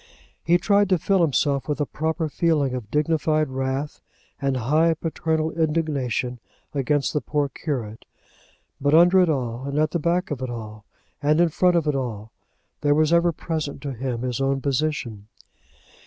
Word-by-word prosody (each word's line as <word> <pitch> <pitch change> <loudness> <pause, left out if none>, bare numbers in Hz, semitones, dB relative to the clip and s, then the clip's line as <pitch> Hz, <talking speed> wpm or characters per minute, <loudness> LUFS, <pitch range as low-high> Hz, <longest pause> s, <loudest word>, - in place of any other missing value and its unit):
He 170 +1 +4
tried 200 +2 +2
to 185 - +4
fill 190 +3 +1
himself 140 -3 +1
with 150 - -1
a 145 - +1
proper 160 +2 -2
feeling 150 -3 +1
of 120 -5 -5
dignified 155 0 +1
wrath 135 +2 -3 0.4
and 135 -1 0
high 155 +7 +2
paternal 160 0 -1
indignation 150 -7 -1 0.3
against 145 0 0
the 150 - 0
poor 145 -2 -1
curate; 120 -8 -5 0.8
but 145 +2 +3
under 175 +3 +6
it 180 -2 +4
all, 125 -3 -2
and 140 +1 -3
at 155 0 +2
the 170 - -1
back 175 +3 0
of 135 -3 -3
it 130 - -3
all, 110 -2 -8 0.4
and 150 +2 +2
in 175 -1 +4
front 180 +2 +2
of 165 -2 +2
it 150 - +1
all, 115 -5 -4 0.5
there 145 0 +3
was 155 +2 +3
ever 170 0 +4
present 155 -3 -4
to 140 -2 -3
him 125 -1 -4
his 125 0 -2
own 135 0 +1
position. 135 -7 -2
150 Hz, 170 wpm, -23 LUFS, 130-160 Hz, 0.8 s, under